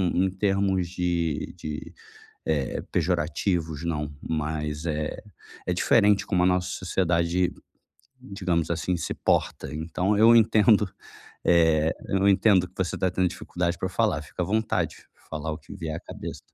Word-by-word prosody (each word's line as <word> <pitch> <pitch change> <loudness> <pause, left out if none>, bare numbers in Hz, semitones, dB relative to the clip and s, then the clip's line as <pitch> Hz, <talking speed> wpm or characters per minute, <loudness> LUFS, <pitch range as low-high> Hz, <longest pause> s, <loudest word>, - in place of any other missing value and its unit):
em 95 +1 +3
termos 95 -2 +1
de 85 -4 -1
de, 75 -1 -6 0.5
eh, 75 -5 0
pejorativos, 85 -1 0
não, 75 -3 -2
mas 75 0 -3
é 75 -1 -2 0.5
é 90 - +1
diferente 105 +2 +4
como 90 -3 +2
a - - +5
nossa 90 0 +2
sociedade, 90 -1 0 0.7
digamos 90 -4 -2
assim, 85 +2 -1
se - - -3
porta, - - 0
então, 90 +6 -1
eu 115 +2 +7
entendo, 110 -2 +5 0.6
eh, 80 -2 +4
eu 95 +1 +2
entendo 95 -2 +4
que 90 - -29
você 95 -2 -1
está 95 - 0
tendo 95 0 +1
dificuldade 85 0 -2
pra 95 - -2
falar, - - +1
fica - - -5
à - - +1
vontade 110 +2 0
de - - -20 0.2
falar 80 0 -3
o 75 - -5
que 80 - -12
vier 80 -2 -4
à - - -7
cabeça. - - -8
90 Hz, 150 wpm, -26 LUFS, 80-95 Hz, 0.7 s, eu